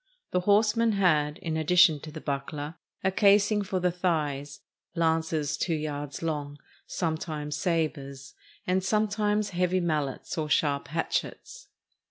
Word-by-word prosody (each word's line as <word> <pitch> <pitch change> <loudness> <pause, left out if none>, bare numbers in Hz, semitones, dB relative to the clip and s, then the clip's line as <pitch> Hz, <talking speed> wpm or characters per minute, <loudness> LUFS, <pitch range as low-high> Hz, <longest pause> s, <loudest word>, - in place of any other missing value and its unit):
The 180 - +2
horsemen 215 +4 +3
had, 155 -7 +2
in 160 -2 -2
addition 160 0 +5
to 155 - -9
the 155 - -7
buckler, 145 +2 -4 0.3
a 190 - +2
casing 205 +1 +4
for 190 -1 -2
the 180 0 +1
thighs, 150 -5 -2 0.3
lances 160 -3 0
two 165 +1 0
yards 145 -1 -4
long, 145 -3 -3 0.3
sometimes 155 -3 -3
sabers, 150 -4 -2 0.3
and 185 +1 +1
sometimes 210 0 +1
heavy 180 +1 +1
mallets 155 -3 -2
or 155 -1 -2
sharp 145 -2 +1
hatchets. 335 - -3
160 Hz, 130 wpm, -28 LUFS, 150-190 Hz, 0.3 s, addition